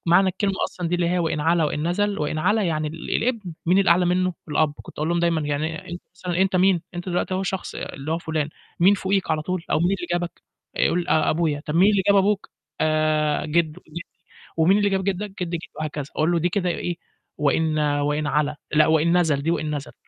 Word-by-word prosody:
معنى 185 +3 +5
الكلمة 195 +1 -1
أصلًا 175 -2 -4
دي 175 - 0
اللي 175 -1 +1
هي 180 +1 +1
وإن 160 -3 -1
علا 165 +1 +2
وإن 150 +2 -1
نَزَل، 205 +3 0
وإن 150 +1 -2
علا 205 +6 +2
يعني 155 -4 -1
ال 160 +2 -3
الابن، 225 -7 -2
مين 180 +3 +4
الأعلى 180 -2 +4
منه؟ 185 +1 +1 0.2
الأب. 150 0 +1
كنت - - -14
أقول 155 +1 -1
لهم 170 0 +1
دايمًا 170 -2 +2
يعني 150 +2 -3
أنت 175 - -7
مثلًا 180 -1 -2
أنت 190 -1 +1
مين؟ 185 -2 +3
أنت 175 +1 -5
دلوقتي 180 +1 -1
أهو 190 - -1
شخص 190 0 -4
اللي 145 +4 -5
هو 165 - 0
فلان، 155 -3 -2 0.3
مين 190 +4 +6
فوقيك 195 0 -1
على 155 -1 0
طول، 180 +1 -3
أو - - +3
مين 170 - +2
اللي 185 -3 -2
جابك؟ 175 -1 -3 0.3
يقول 175 +1 +1
آآ، 155 -1 +3
أبويا. 155 -3 0
طَب 150 - -3
مين 190 +5 +5
اللي 200 -2 +2
جاب 200 - +5
أبوك؟ 200 +1 +2 0.3
آآ، 155 -1 +1
جِدّه 160 +1 0
جِدّي. 160 +2 -7 0.6
ومين 175 +5 +4
اللي 205 -1 +2
جاب 190 -1 0
جِدّك؟ 200 +1 -2
جدّ 175 - -3
جدّ 170 - -2 0.2
وهكذا 150 -2 -3
أقول 160 +3 +2
له 170 - +2
دي 170 +2 +1
كده 180 0 -1
إيه، 175 0 -3 0.4
وإن 155 +1 +1
وإن 145 0 0
علا 150 0 0 0.2
لأ 155 0 +5
وإن 160 +2 +3
نَزَل، 155 -5 +1
دي 160 - 0
وإن 155 -2 -1
نَزَل، 145 - -7
170 Hz, 225 wpm, -23 LUFS, 155-185 Hz, 0.6 s, مين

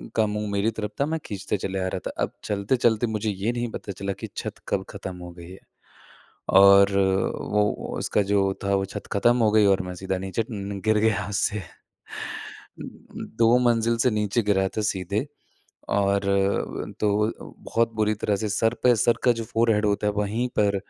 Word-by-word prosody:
का 110 - +3
मुँह 105 0 -3
मेरी 100 +2 +1
तरफ़ 105 -1 -4
था, - - +3
मैं 160 +1 -2
खींचते 100 +1 -3
चले 95 0 -3
आ 95 - -1
रहा 95 - -3
था। - - -4
अब - - -2
चलते-चलते 110 +3 +1
मुझे 110 -1 -2
ये 100 +4 -1
नहीं 120 0 -2
पता 100 - -6
चला 100 +1 -4
कि - - -5
छत - - -4 0.2
कब - - -1
ख़त्म 95 -1 -7
हो 90 0 -9
गई 85 0 -12
है 95 - -11 1.0
और 100 0 +7 0.6
वो 105 0 +3 0.3
उसका - - 0
जो 95 -1 +2
था 100 0 +1
वो 95 0 0
छत 95 - -8
खत्म 120 +4 +3
हो 110 -3 +3
गई 105 -1 +5
और 95 -1 +3
मैं 90 0 -6
सीधा 95 +1 -3
नीचे 95 +3 -2
न 100 -2 -5
गिर 110 0 +3
गया 105 -2 +2
छत - - -7
उससे। 105 +1 0
उ - - -7 1.2
उ - - -5 0.5
2 115 +1 +5
मंजिल 115 0 +2
से - - +6
नीचे 105 +1 0
गिरा 95 -2 +2
था - - +1
सीधे 100 - -1 0.6
और 100 0 +1
अ, 100 0 0
तो 105 +1 +2 0.3
बहुत 115 0 0
बुरी 110 0 +2
तरह 105 - +2
से 110 +1 -2
सर 115 +3 +1
पे 125 -1 +6
सर 115 +2 +2
का 125 - +6
जो - - -5
फोरहेड 110 -1 +2
होता 105 0 +1
है 105 - +1
वहीं 105 +4 -1
पर 100 -1 +3
105 Hz, 200 wpm, -25 LUFS, 100-110 Hz, 1.2 s, और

